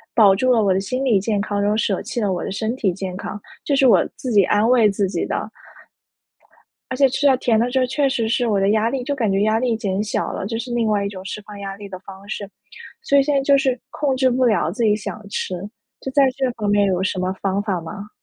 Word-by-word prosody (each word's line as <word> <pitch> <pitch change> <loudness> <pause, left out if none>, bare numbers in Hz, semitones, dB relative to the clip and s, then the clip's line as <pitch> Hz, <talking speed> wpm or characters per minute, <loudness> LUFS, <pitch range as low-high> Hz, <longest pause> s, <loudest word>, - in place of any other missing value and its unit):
保 205 -5 +6
住 255 +5 +2
了 230 -3 +3
我 195 -2 +3
的 190 - +1
心 255 +7 -3
理 225 -7 +3
健 210 0 -1
康， 205 -1 -2
然 205 - +1
后 210 - +1
舍 205 -3 0
弃 - - -4
了 205 -4 0
我 180 - -3
的 - - -4
身 220 +4 -2
体 210 -7 0
健 185 0 -5
康， 210 - -6 0.2
这 285 - 0
是 270 - +4
我 235 - +5
自 255 - -5
己 205 -3 +6
安 210 +2 +2
慰 235 -3 +5
自 200 0 0
己 190 - -2
的。 - - -3 1.4
而 255 - -2
且 275 0 +5
吃 280 +3 +1
到 265 -2 +4
甜 230 -3 +2
的 240 +2 0
时 260 - +1
候 255 - +3
确 275 +2 0
实 235 -4 -1
是 235 +2 +1
我 205 -3 +1
的 195 +1 +2
压 220 +1 +2
力 260 0 -3
就 285 +3 -2
感 225 -7 0
觉 195 +1 +1
压 215 +1 +2
力 235 -2 0
减 200 -2 -2
小 215 - -2
了， 195 - -4
这 225 +1 -3
是 245 +2 -5
另 235 -2 +1
外 205 -2 +1
一 - - -2
种 190 -2 -9
释 195 - -5
放 205 0 -11
压 195 -1 -6
力 205 0 -9
的 185 -1 -8
方 195 +1 -13
式， 205 -1 -5 0.5
所 280 - +1
以 - - +7
现 295 +1 0
在 - - +4
就 280 0 +4
是 260 -3 0
控 280 -3 -1
制 260 0 +3
不 255 +1 +1
了 210 -8 +2
自 225 +6 -2
己 210 -2 +4
想 215 0 -7
吃， 190 - -3 0.5
就 265 - -5
在 280 - +5
这 265 -2 0
方 215 -3 -4
面 205 0 +3
有 185 -1 0
什 190 -1 -1
么 185 0 -1
方 195 0 0
法 200 -4 -2
吗？ 195 +5 -8
215 Hz, 300 characters per minute, -21 LUFS, 200-250 Hz, 1.4 s, 以